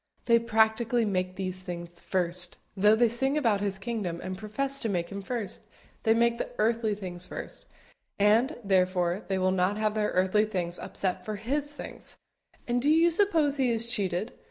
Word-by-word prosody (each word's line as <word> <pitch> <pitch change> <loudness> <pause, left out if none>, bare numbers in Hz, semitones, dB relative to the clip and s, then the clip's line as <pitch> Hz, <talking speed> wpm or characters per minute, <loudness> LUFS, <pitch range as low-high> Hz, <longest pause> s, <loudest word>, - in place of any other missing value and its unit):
They 235 -1 +5
practically 230 +1 +2
make 185 -2 -1
these 185 -1 -3
things 175 -1 -8
first, 175 -1 +2 0.2
though 210 +2 +5
they 240 +1 +4
sing 265 +5 +1
about 225 -8 +2
His 200 -1 -2
kingdom 195 -5 -3
and 185 - -4
profess 270 +8 0
to 225 - -2
make 175 -3 -1
Him 200 0 -6
first: 215 -1 -5 0.4
they 225 -1 +3
make 235 0 +2
the - - -3
earthly 220 -1 +1
things 180 -3 -6
first, - - -7 0.5
and, 220 +8 +3
therefore, 185 -1 +1
they 190 - 0
will 185 0 +2
not 190 +2 +1
have 215 -1 0
their 215 -1 0
earthly 190 +4 +2
things 180 -5 -3
upset 185 -1 -3
for 215 +2 -4
His 280 +8 -2
things; 295 - -10 0.5
and 245 0 +1
do 285 - +2
you 330 +2 +5
suppose 325 -6 +2
He 260 -2 +2
is 230 0 0
cheated? 200 -1 -1
210 Hz, 180 wpm, -28 LUFS, 185-235 Hz, 0.5 s, They